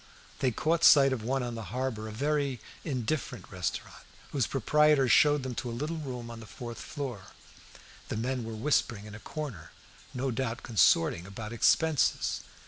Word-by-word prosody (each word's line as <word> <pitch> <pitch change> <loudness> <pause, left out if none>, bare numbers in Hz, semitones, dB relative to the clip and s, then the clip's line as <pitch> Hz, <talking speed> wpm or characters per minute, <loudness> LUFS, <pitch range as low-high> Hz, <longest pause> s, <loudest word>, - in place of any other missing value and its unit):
They 130 - +2
caught 160 +8 0
sight 135 -2 +8
of 125 - -3
one 130 +3 -1
on 120 -1 -3
the 115 -2 -6
harbour, 120 -2 -3
a - - -6
very 140 +1 0 0.2
indifferent 135 -2 -3
restaurant, 90 -4 -4 0.3
whose 135 -4 +1
proprietor 150 +1 +3
showed 145 +3 +5
them 130 -1 -3
to 120 - -4
a 115 0 -5
little 155 +3 -2
room 125 -6 -6
on 115 - -8
the 110 - -11
fourth 120 0 -8
floor. 125 -9 -6 0.8
The - - -2
men 125 +2 -1
were 115 0 -6
whispering 110 -3 0
in 105 - -10
a 105 - -8
corner, 110 - -6 0.4
no 130 0 -2
doubt 120 0 -3
consorting 90 -6 +3
about 105 +3 -7
expenses. 155 +5 +2
125 Hz, 170 wpm, -30 LUFS, 110-140 Hz, 0.8 s, sight